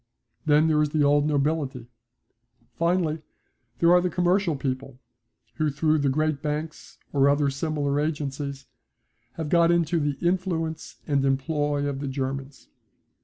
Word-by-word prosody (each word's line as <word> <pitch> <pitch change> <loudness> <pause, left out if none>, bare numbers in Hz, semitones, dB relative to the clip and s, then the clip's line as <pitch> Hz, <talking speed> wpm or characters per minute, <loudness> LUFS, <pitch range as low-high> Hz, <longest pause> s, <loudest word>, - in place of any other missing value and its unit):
Then 150 +1 +5
there 155 -1 +3
is 150 - +1
the 150 0 +1
old 145 +1 +3
nobility. 145 -4 -1 0.9
Finally, 170 -2 0 0.6
there 170 +5 +4
are 180 0 +6
the 180 - 0
commercial 180 0 +1
people 130 -1 -4 0.6
who 155 -2 +1
through 155 +2 +1
the 140 -1 +1
great 155 +1 0
banks 155 +1 -5 0.2
or 140 -1 +4
other 145 0 +2
similar 145 0 -1
agencies 140 -2 -3 0.7
have 160 -2 -5
got 170 0 +4
into 170 -1 +2
the 145 -2 -1
influence 170 -3 -2
and 140 -3 +1
employ 145 +1 0
of 140 -1 -2
the 140 - -4
Germans. 135 0 -5
150 Hz, 140 wpm, -25 LUFS, 140-160 Hz, 0.9 s, are